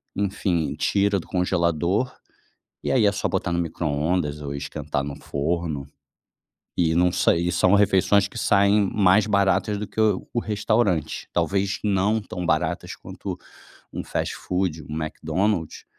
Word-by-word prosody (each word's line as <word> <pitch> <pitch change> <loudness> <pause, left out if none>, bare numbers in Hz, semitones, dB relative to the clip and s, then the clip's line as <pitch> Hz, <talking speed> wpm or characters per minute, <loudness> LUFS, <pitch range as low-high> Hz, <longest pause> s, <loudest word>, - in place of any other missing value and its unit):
enfim, 95 -5 -1
tira 100 +6 +1
do - - -11
congelador, 90 +4 0 0.7
e - - -2
aí 125 -5 +4
é 100 - +5
só 100 - -1
botar 95 -2 -1
no 85 - 0
micro-ondas 75 -1 -1
ou 70 -1 -5
esquentar 70 -1 -3
no 70 0 -5
forno. 75 -1 -2 0.9
E 80 -2 +2
não 90 +1 +4
sei 85 +1 +2
e - - 0
são 95 +2 +4
refeições 100 0 +4
que - - -9
saem 100 -1 +3
mais 100 +1 +4
baratas 100 0 +2
do 105 - -4
que - - -4
o 110 -1 +2
o - - +1
restaurante, 105 -6 0
talvez 100 0 0
não 105 +2 +2
tão 90 -3 -5
baratas - - 0
quanto - - -7 0.6
um - - -4
fast-food, 90 -4 -2
um 75 - -4
McDonald's, 80 +3 -2
90 Hz, 145 wpm, -24 LUFS, 80-100 Hz, 0.9 s, é